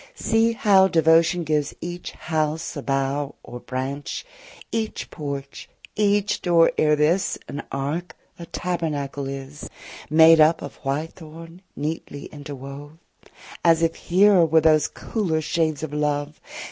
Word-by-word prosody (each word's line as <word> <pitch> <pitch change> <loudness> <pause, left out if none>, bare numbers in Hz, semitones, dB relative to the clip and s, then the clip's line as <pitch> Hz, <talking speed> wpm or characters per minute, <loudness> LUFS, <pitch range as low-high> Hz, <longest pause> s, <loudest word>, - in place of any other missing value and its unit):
see 225 - +2
how 205 -6 +5
Devotion 165 0 +3
gives 150 -2 -1
each 175 +1 -6
house 160 0 -2
a 145 - -4
bough 135 +1 -1
Or 120 - -9
branch! 135 - -5 0.5
each 220 -1 -3
porch, 140 -2 -6 0.3
each 205 0 +1
door, 170 -2 +4
ere 150 0 +3
this, 165 +6 +1
An 140 - -5
ark, 145 +6 -3 0.2
a 170 - -8
tabernacle 145 -6 -3
is, 135 +2 -7 0.4
Made 160 +1 +7
up 155 +2 +4
of - - -8
white 145 +3 -3
thorn 165 +1 -12
neatly 145 -1 -5
interwove, 145 +1 -9 0.2
35 - - -23 0.3
As 165 -1 +4
if 165 0 +2
here 190 0 +4
were 160 0 +4
those 155 -1 +4
cooler 180 -8 -2
shades 155 -1 -1
of 155 -2 -5
love. 150 0 -2
155 Hz, 135 wpm, -23 LUFS, 145-170 Hz, 0.5 s, Made